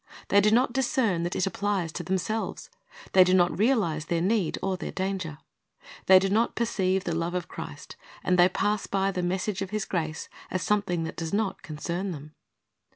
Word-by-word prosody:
They 200 - +5
do 210 - +4
not 240 +3 +3
discern 250 - +1
that 175 +1 -2
it 185 - +1
applies 195 -3 -1
to 175 - -5
themselves. 190 +5 -3 0.4
They 185 - +8
do 185 +1 +3
not 175 -1 +3
realize 200 - +1
their 170 +1 0
need 190 -1 +1
or 190 0 0
their 185 - -5
danger. 185 -5 -3 0.7
They 190 - +9
do 190 +1 +3
not 220 +4 +1
perceive 190 -5 0
the 170 - -2
love 165 +2 -2
of 175 -2 -2
Christ, - - -9 0.3
and 180 - +2
they 175 +1 +7
pass 210 +3 -1
by 195 0 +1
the 180 -1 -2
message 190 +3 -1
of 195 - -3
His 215 0 -2
grace 160 -3 -3 0.2
as 185 - -2
something 200 -5 0
that 160 - -6
does 165 +1 -4
not 205 -2 -1
concern 170 +5 -4
them. 150 0 -10
185 Hz, 195 wpm, -27 LUFS, 175-205 Hz, 0.7 s, They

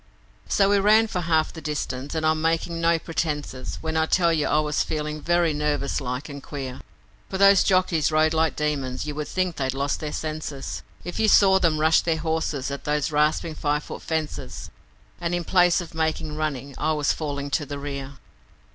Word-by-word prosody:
So 200 0 +3
we 205 - +4
ran 215 +3 +5
for 185 -5 -3
half 160 -2 +1
the 160 - -8
distance, 145 -2 -4
and 160 0 0
I'm 155 0 +2
making 165 +1 0
no 170 0 +3
pretences 150 -5 -3
When 160 0 -3
I 160 0 +2
tell 170 -1 +3
you 155 -2 +1
I - - +2
was 150 -1 0
feeling 150 -1 -3
very 175 -1 +2
nervous 145 -1 -1
like 125 +1 -4
and 140 -2 -8
queer, 135 -2 -6 0.5
For 190 - -3
those 200 -1 +6
jockeys 185 -5 +2
rode 155 +1 +3
like 160 -1 +1
demons; 140 -4 -2
you 150 - -4
would 150 0 -4
think 185 -2 -1
they'd 130 -1 -1
lost 140 +1 -1
their 150 -1 -4
senses 155 -3 -5 0.2
If 175 +1 -5
you 220 - +3
saw 195 -2 +6
them 165 -4 +2
rush 160 +1 +4
their 165 -2 0
horses 160 -4 -2
at 140 - -5
those 150 +1 0
rasping 155 +2 +1
five 150 -1 -1
foot - - -8
fences 160 -2 -4 0.5
And 175 0 -1
in 175 - -2
place 175 +1 +4
of 170 -1 -9
making 160 -1 -1
running 140 -3 -3
I 155 - +1
was 150 -2 +1
falling 145 -2 -4
to 150 - 0
the 145 - -5
rear. 140 -1 -5
155 Hz, 200 wpm, -24 LUFS, 145-165 Hz, 0.5 s, those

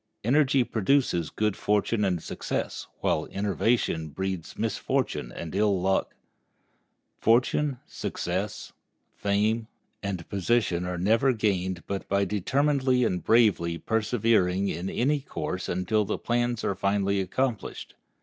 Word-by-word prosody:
Energy 135 +2 +4
produces 110 - +1
good 105 +2 0
fortune 105 +1 +1
and 90 -5 0
success, - - -4
while - - +1
enervation 100 -4 0
breeds 95 +2 -4
misfortune - - -1
and 80 +4 -7
ill 100 -1 +2
luck. 95 +1 0 1.0
Fortune, 125 +4 +2
success, - - -4 0.4
fame, 105 +3 0 0.6
position 100 -3 +1
are 90 0 -3
never 115 +8 +3
gained 95 -5 -1
but 100 -1 -4
by 100 0 +2
determinedly 130 +6 +1
and 90 -6 0
bravely 100 -8 +3
persevering 105 -2 +1
in 90 +4 -3
any 145 +5 +1
course 95 -8 -4
until 100 +4 +1
the 100 - -2
plans 120 -1 -1
are - - +1
finally 100 0 +1
accomplished. 120 +4 -2
105 Hz, 115 wpm, -27 LUFS, 95-120 Hz, 1.0 s, Energy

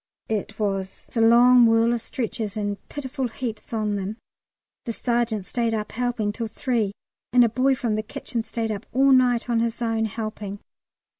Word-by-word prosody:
It 220 0 -2
was 195 -3 -3
a 230 - +2
long 240 +1 +7
whirl 225 +1 +4
of 235 - -2
stretchers, 225 -4 -4
and 205 -1 -2
pitiful 265 -2 -3
heaps 225 -2 -6
on 215 -2 0
them. 200 +3 -4 0.7
The 230 - -2
sergeant 235 -4 0
stayed 230 0 0
up 210 -1 -4
helping 240 -3 -1
till 230 +2 -4
3, 220 -2 -1 0.4
and 250 -1 +7
a - - +2
boy 260 +4 +2
from 235 -3 -1
the 215 - 0
kitchen 225 +2 -4
stayed 225 0 -3
up 205 0 -5
all 270 +1 +5
night 250 -2 +4
on 235 -2 +1
his 230 0 -1
own, 225 -1 0
helping. 215 -2 -5
225 Hz, 175 wpm, -24 LUFS, 215-245 Hz, 0.7 s, long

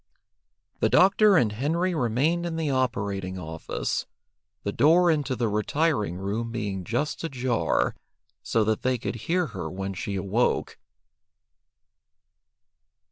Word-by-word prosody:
The - - +2
doctor 195 +1 +5
and 115 -8 +3
Henry 165 - 0
remained 150 +5 +1
in 165 - -4
the 160 -3 -1
operating 100 -8 -1
office, 80 -2 -3 0.6
the 100 - -1
door 170 - +5
into 145 -4 0
the 120 -2 0
retiring 105 - 0
room 105 +5 -3
being 100 -5 -3
just 120 - -2
ajar, 125 - 0 0.5
so 115 - +1
that 110 0 0
they 130 0 +1
could - - -4
hear 180 +1 +2
her 90 -5 -4
when 95 +2 -4
she 100 +2 -4
awoke. 100 +5 0
120 Hz, 125 wpm, -26 LUFS, 100-155 Hz, 0.6 s, doctor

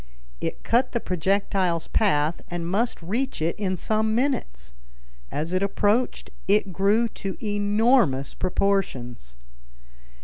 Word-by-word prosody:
It - - -4
cut 245 +3 +1
the 235 - +1
projectile's 185 -2 0
path 160 -6 +1
and 175 -1 -4
must 220 +7 0
reach 230 +10 -2
it 160 +2 0
in 185 -3 -1
some 215 +3 0
minutes. 65 - -2 0.6
As 160 +4 -3
it 185 - +1
approached 205 +4 0 0.2
it 200 -1 +2
grew 205 +5 +3
to 195 -2 -6
enormous 205 - +2
proportions. 135 - -1
195 Hz, 115 wpm, -25 LUFS, 165-215 Hz, 0.6 s, grew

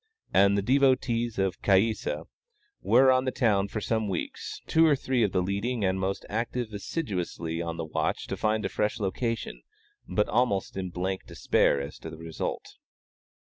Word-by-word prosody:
And 100 +1 +5
the 100 - 0
devotees 125 -2 +2
of 95 -2 -1
Caïssa 105 +3 +1 0.6
were 130 0 +5
on 130 0 +2
the 130 - 0
town 100 -6 +2
for 110 - -4
some 110 0 -1
weeks, 95 - -4
two 160 - +4
or 150 - +5
three 130 -2 0
of 105 -4 +2
the 90 -1 +1
leading 100 +4 -1
and 95 0 +1
most 95 +1 -2
active 115 +1 -3
assiduously 90 - -3
on 85 -1 -4
the 80 - -3
watch 80 - -1
to - - -4
find 110 0 0
a - - 0
fresh 105 +2 -1
location, 105 - -2 0.5
but 105 +3 +1
almost 110 -4 +1
in 95 -1 -3
blank 95 +2 -3
despair 70 - +2
as 70 +2 -6
to - - -7
the 80 - -9
result. 80 0 -5
100 Hz, 175 wpm, -28 LUFS, 95-120 Hz, 0.6 s, And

